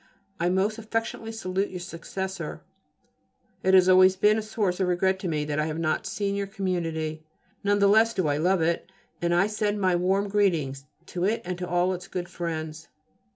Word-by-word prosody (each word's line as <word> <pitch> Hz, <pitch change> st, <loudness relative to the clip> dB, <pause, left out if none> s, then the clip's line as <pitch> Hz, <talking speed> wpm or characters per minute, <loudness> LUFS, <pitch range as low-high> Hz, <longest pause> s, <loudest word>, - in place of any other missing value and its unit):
I 175 Hz, +1 st, +2 dB
most 200 Hz, +4 st, +1 dB
affectionately 225 Hz, 0 st, -3 dB
salute 195 Hz, -3 st, -2 dB
your 180 Hz, -, -6 dB
successor. 185 Hz, +2 st, -5 dB, 1.0 s
It 190 Hz, 0 st, +4 dB
has 185 Hz, -1 st, +6 dB
always 185 Hz, 0 st, +6 dB
been 210 Hz, +3 st, +4 dB
a -, -, -2 dB
source 210 Hz, -4 st, -1 dB
of 190 Hz, -, +1 dB
regret 190 Hz, +2 st, +1 dB
to 190 Hz, -, -4 dB
me 150 Hz, -3 st, -1 dB
that 150 Hz, 0 st, -2 dB
I 155 Hz, -, +1 dB
have 155 Hz, 0 st, -3 dB
not 160 Hz, -1 st, -1 dB
seen 200 Hz, 0 st, -2 dB
your 200 Hz, 0 st, -2 dB
community: 165 Hz, -6 st, -2 dB, 0.4 s
none 205 Hz, 0 st, +3 dB
the 200 Hz, 0 st, +4 dB
less 220 Hz, +3 st, +5 dB
do 185 Hz, -5 st, +1 dB
I 145 Hz, 0 st, +1 dB
love 175 Hz, +2 st, +2 dB
it, 170 Hz, +1 st, -1 dB, 0.3 s
and 170 Hz, 0 st, +1 dB
I 175 Hz, +3 st, +4 dB
send 210 Hz, 0 st, -1 dB
my 185 Hz, -2 st, +2 dB
warm 190 Hz, +3 st, +1 dB
greetings 165 Hz, -10 st, 0 dB, 0.2 s
to 180 Hz, 0 st, -2 dB
it 220 Hz, +3 st, 0 dB
and 180 Hz, 0 st, -3 dB
to 180 Hz, -, -3 dB
all 175 Hz, +2 st, +2 dB
its 180 Hz, +1 st, -7 dB
good 175 Hz, -2 st, -5 dB
friends. 160 Hz, -2 st, -5 dB
185 Hz, 200 wpm, -26 LUFS, 170-200 Hz, 1.0 s, has